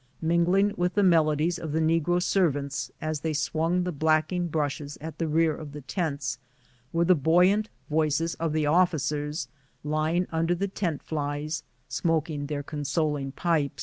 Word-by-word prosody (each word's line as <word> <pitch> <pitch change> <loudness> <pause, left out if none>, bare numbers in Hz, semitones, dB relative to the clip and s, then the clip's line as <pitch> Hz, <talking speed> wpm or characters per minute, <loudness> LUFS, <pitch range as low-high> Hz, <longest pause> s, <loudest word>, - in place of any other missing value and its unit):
Mingling 175 +5 +3
with 180 +1 0
the 205 - +3
melodies 165 -1 +3
of 160 -3 -5
the 160 - +1
negro 165 +2 +2
serv 175 -4 +2
ants, 140 0 -4
as 155 -1 -2
they 160 +1 -2
swung 165 +4 0
the 180 - -2
blacking 155 +3 +1
brushes 145 -2 -2
at 155 0 -8
the 165 - 0
rear 160 0 +2
of 150 -2 -9
the 150 - -7
tents, 140 -3 -2 0.5
were 170 +1 +2
the 185 - +6
buoyant 180 +7 +3 0.2
voices 155 +1 +1
of 165 -1 0
the 155 0 +1
officers 150 -2 +1 0.4
ly 155 +2 0
ing 180 +1 +1
under 165 +2 +1
the 195 +3 -1
tent 175 -6 -3
flies, 150 0 -3 0.3
smoking 150 +2 -1
the 145 -1 -3
consoling 145 -1 -1
pipe. 155 -3 0
160 Hz, 165 wpm, -27 LUFS, 150-170 Hz, 0.5 s, the